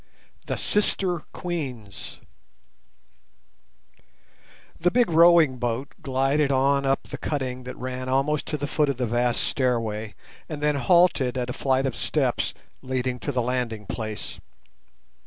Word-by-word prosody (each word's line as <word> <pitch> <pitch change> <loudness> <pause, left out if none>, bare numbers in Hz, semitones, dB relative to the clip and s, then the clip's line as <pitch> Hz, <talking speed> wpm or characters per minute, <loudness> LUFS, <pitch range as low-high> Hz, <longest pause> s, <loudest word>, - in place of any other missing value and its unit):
THE - - -2
SISTER 190 -4 +2
QUEENS 130 - -5 2.6
The 175 - +3
big 240 -2 +2
rowing 165 -5 +6
boat 120 +3 -2
glided 135 0 +1
on 140 +1 +2
up 135 0 +1
the - - -8
cutting 130 -4 -3
that 125 - -7
ran 130 0 -4
almost 140 +3 +1
to 150 - -2
the 145 - -3
foot 150 0 +1
of 140 - -1
the 125 - 0
vast 120 +1 +1
stairway, 115 -5 -1 0.3
and 155 -2 -5
then 150 0 +2
halted 140 -4 +3
at 125 0 -2
a - - -4
flight 135 0 +1
of 130 -3 -1
steps - - 0 0.3
leading 130 -1 -2
to 145 - -3
the 125 -3 0
landing 120 -4 -2
place. 110 0 -5
130 Hz, 140 wpm, -25 LUFS, 125-150 Hz, 2.6 s, rowing